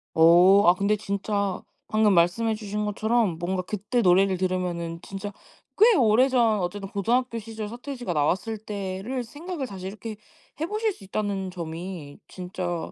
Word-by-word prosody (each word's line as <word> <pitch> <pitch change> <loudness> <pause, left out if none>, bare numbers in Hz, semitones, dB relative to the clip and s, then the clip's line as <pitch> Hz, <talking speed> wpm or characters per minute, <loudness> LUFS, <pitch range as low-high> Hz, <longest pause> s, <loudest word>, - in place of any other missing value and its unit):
오. 175 +5 +7
아 175 - +8
근데 200 +3 +1
진짜 200 -1 -2 0.3
방금 215 -1 +3
말씀해 190 +6 +2
주신 210 0 -3
것처럼 215 -3 +1
뭔가 185 +1 -1
그때 210 +5 -2
노래를 190 0 +4
들으면은 175 -2 -2
진짜 195 +2 -6 0.5
꽤 445 +2 +6
오래전 235 - +4
어쨌든 195 +2 -4
고등학교 235 +5 0
시절 220 -1 -6
서태지가 245 -3 -5
나왔을 185 +9 0
때를 205 +4 -4
생각을 295 +4 -6
다시 190 -4 -8
이렇게 215 +2 -7 0.4
해 320 - 0
보실 430 +4 -1
수 285 - -13
있다는 195 -1 -3
점이 170 -3 -7
진짜 180 -2 -5
200 Hz, 325 characters per minute, -25 LUFS, 185-225 Hz, 0.5 s, 아